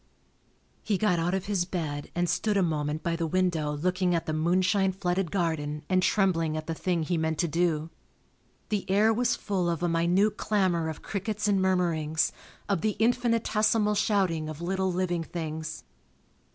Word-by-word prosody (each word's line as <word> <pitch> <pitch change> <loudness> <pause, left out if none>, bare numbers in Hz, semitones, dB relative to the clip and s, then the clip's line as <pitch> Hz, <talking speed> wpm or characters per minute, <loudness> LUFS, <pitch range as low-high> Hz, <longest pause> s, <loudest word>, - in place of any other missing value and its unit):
He 205 -3 0
got 180 -4 +2
out 175 +3 0
of 190 - -3
his 195 -3 0
bed 155 -5 -4
and 175 0 +1
stood 200 +5 +1
a 195 - +3
moment 155 -2 -1
by 170 -1 0
the 165 -1 -1
window 170 -3 0
looking 180 +2 +1
at 165 - -1
the 155 - -2
moonshine 185 +4 +2
flooded 185 -1 -1
garden 155 -4 -2
and 185 -1 +3
trembling 165 -6 +1
at 155 - -5
the 165 - -3
thing 170 0 -1
he 170 +1 -1
meant 160 0 -1
to 170 - +1
do. 165 -1 0 0.8
The 205 -3 -2
air 210 +3 +4
was 245 +2 +1
full 185 -4 -1
of 170 0 -2
a - - +2
minute 175 +5 +2
clamor 185 -6 +1
of 160 - -7
crickets 210 +1 -2
and 200 -2 +2
murmurings, 170 -4 +1 0.4
of 200 -5 0
the 215 -1 0
infinitesimal 225 -2 +2
shouting 190 -7 +1
of 155 -1 -7
little 190 +2 -1
living 175 -2 -1
things. 160 -2 -5
175 Hz, 175 wpm, -28 LUFS, 160-195 Hz, 0.8 s, air